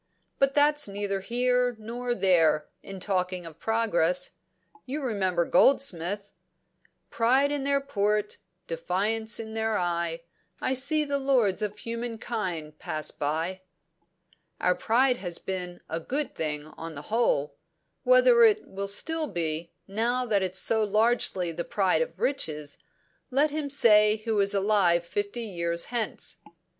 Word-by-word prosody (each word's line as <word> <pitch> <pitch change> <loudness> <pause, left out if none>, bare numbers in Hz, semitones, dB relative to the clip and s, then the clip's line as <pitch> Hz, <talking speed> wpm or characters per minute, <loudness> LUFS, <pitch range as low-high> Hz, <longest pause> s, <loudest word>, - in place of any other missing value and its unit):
But 275 0 +3
that's 295 -1 +4
neither 200 0 -2
here 245 +4 +1
nor 240 +3 -4
there, 165 -7 +3
in 195 -1 -8
talking 185 -2 -1
of 165 -1 -11
progress. 180 -6 +1 0.6
You 280 +4 -3
remember 190 -8 0
Goldsmith 200 -4 +2 0.8
'Pride 260 +5 +3
in 285 -2 -2
their 280 0 +2
port, 210 -5 -1 0.3
defiance 205 +8 -1
in 220 -1 -6
their 220 -1 0
eye, 170 -1 -1 0.4
I 260 - 0
see 285 +4 +2
the 280 -1 -1
lords 245 -8 +2
of 210 0 -3
human 230 +1 -5
kind 180 -10 -4
pass 155 0 -3
by.' 165 +6 -2 1.0
"Our 180 - +3
pride 245 +6 +2
has 175 -5 -4
been 180 -2 -5
a 165 - -3
good 275 - -3
thing, 150 -2 -3
on 160 +1 -9
the 145 - -7
whole. 225 -11 +1 0.5
Whether - - +6
it 435 -1 +4
will 200 +1 -5
still 315 +10 0
be, 165 - -3 0.2
now 235 +5 0
that 210 -4 +1
it's 185 0 -1
so 220 +2 +2
largely 210 -4 +1
the 170 +1 -4
pride 195 - +1
of - - -4
riches, 150 - -2 0.5
let 280 +3 +2
him 300 -1 -3
say 215 -6 +5
who 220 -2 +1
is 200 0 +2
alive 190 -4 +3
fifty 205 +6 -3
years 170 -5 -2
hence." 230 -3 -3
210 Hz, 140 wpm, -27 LUFS, 175-245 Hz, 1.0 s, Whether